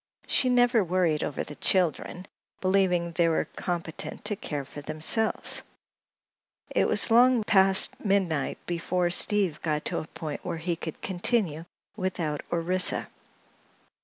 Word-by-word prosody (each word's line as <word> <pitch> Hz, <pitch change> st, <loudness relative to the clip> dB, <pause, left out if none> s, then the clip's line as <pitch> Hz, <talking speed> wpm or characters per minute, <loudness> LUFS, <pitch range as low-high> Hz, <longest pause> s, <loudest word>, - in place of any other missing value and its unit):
She 255 Hz, -, +3 dB
never 245 Hz, -3 st, +3 dB
worried 175 Hz, -4 st, 0 dB
over 145 Hz, -, -3 dB
the 150 Hz, -, -9 dB
"children," 180 Hz, +2 st, -1 dB, 0.3 s
believing 185 Hz, -3 st, +1 dB
they 165 Hz, 0 st, +1 dB
were 160 Hz, -, 0 dB
competent 170 Hz, -1 st, -5 dB
to 210 Hz, 0 st, 0 dB
care 145 Hz, -8 st, -5 dB
for 145 Hz, -, -10 dB
themselves. 155 Hz, +10 st, 0 dB, 1.1 s
It -, -, +2 dB
was -, -, +6 dB
long 245 Hz, 0 st, +5 dB
past 195 Hz, -2 st, +3 dB
midnight 190 Hz, -8 st, 0 dB
before 175 Hz, +1 st, -1 dB
Steve 190 Hz, -3 st, +3 dB
got 150 Hz, -2 st, -2 dB
to -, -, -1 dB
a 155 Hz, -, -8 dB
point 155 Hz, -3 st, -7 dB
where -, -, -4 dB
he 170 Hz, +1 st, -2 dB
could 160 Hz, -1 st, -8 dB
continue 175 Hz, -4 st, -1 dB, 0.3 s
without 175 Hz, -7 st, -3 dB
Orissa. 180 Hz, +2 st, +1 dB
175 Hz, 135 wpm, -26 LUFS, 160-195 Hz, 1.1 s, was